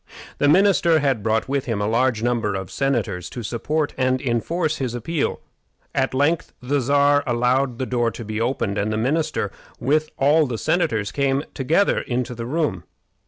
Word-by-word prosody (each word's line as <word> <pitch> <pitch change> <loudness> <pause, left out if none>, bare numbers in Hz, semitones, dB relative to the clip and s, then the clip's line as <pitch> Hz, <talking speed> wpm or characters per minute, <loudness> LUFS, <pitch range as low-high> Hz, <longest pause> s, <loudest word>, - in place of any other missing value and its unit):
The 145 - +3
minister 175 -1 +4
had 135 -7 +1
brought 110 +3 0
with 140 0 -1
him 115 -4 -2
a 105 - 0
large 115 0 +1
number 115 -4 0
of 95 -1 -5
senators 115 -10 -1
to 120 - -7
support 145 +7 -2
and 130 0 +2
enforce 155 +6 -1
his 125 -3 -3
appeal. 145 +6 -2 0.5
At 130 -1 0
length 150 +5 +1
the 140 +3 0
Czar 145 +2 +3
allowed 125 +1 +1
the 130 - -2
door 120 -2 +1
to 115 0 -8
be 110 +1 -3
opened, 115 -4 -1
and 105 +2 -1
the 110 - -1
minister, 145 +8 0 0.3
with 155 +3 +1
all 150 +2 +4
the 120 -3 -3
senators, 115 - 0
came 140 0 0
together 155 +9 +2
into 125 0 -3
the 115 0 -6
room. 130 - -1
130 Hz, 175 wpm, -22 LUFS, 115-145 Hz, 0.5 s, minister